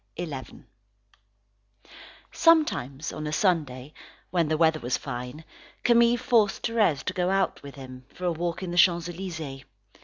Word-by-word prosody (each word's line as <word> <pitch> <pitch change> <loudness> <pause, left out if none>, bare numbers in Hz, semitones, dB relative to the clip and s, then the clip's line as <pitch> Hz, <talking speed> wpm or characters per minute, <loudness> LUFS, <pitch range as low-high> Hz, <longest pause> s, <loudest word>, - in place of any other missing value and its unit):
CHAPTER 155 -6 -5
XI - - -25 0.4
Sometimes 235 - +2
on 155 0 -5
a - - -3
Sunday, 150 -6 0 0.4
when 170 -3 +1
the 155 0 0
weather 160 -1 +3
was 125 -1 -1
fine, 125 +3 -7 0.4
Camille 235 0 +5
forced 230 -4 +2
Thérèse 215 - +1
to 185 - -3
go 180 0 0
out 195 0 0
with 140 -1 -10
him, 130 -2 -10
for 180 - -7
a 175 - +2
walk 170 +2 -3
in 180 - -4
the 175 - -4
Champs 175 -1 +4
Elysees. 160 -7 -6
165 Hz, 155 wpm, -26 LUFS, 140-185 Hz, 0.4 s, Camille